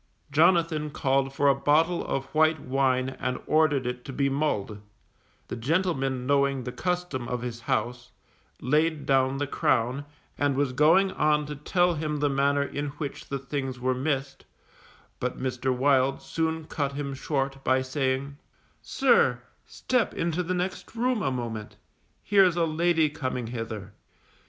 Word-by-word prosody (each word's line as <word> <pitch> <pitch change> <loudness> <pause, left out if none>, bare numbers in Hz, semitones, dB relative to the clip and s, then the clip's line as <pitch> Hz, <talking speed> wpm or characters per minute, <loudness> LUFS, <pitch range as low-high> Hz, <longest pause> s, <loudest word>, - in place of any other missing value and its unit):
Jonathan 160 0 +3
called 135 -2 0
for 140 +1 +1
a 140 - +6
bottle 155 +5 +2
of 135 0 -2
white 155 0 +3
wine 130 -1 +1
and 125 0 -2
ordered 150 -4 +2
it 125 0 -4
to - - -7
be 140 +1 0
mulled; 110 -8 -1 0.7
the - - -5
gentleman 135 -1 0
knowing 140 -1 +2
the 125 - -5
custom 180 -7 -2
of 125 0 -3
his 120 -1 -5
house, 120 +3 -2 0.5
laid 155 +3 +1
down 135 0 +2
the 145 - -1
crown, 125 0 0 0.4
and 145 -1 +2
was 140 -2 0
going 165 +8 +4
on 150 -2 +1
to 150 0 -6
tell 175 +5 +1
him 150 -1 -2
the 145 0 +1
manner 140 +1 +2
in 145 +1 -4
which 145 -3 -6
the 140 - -2
things 135 -1 -4
were 130 +1 +1
missed, 135 +1 -2 0.8
but 125 0 -3
Mr. 130 0 -1
Wild 135 +1 +2
soon 160 -1 -2
cut 140 -2 -2
him 140 -1 -4
short 135 0 -2
by 130 0 +2
saying, 135 +1 -2 0.5
_Sir, - - +3 0.3
step 250 -3 -1
into 170 +1 -1
the 180 +1 -2
next 180 +5 -4
room 245 -1 0
a 135 - +1
moment; 115 -4 -5 0.5
here's 195 -4 +4
a 170 -1 +2
lady 165 0 +2
coming 130 -4 -3
hither. 110 -4 -6
140 Hz, 155 wpm, -27 LUFS, 130-155 Hz, 0.8 s, a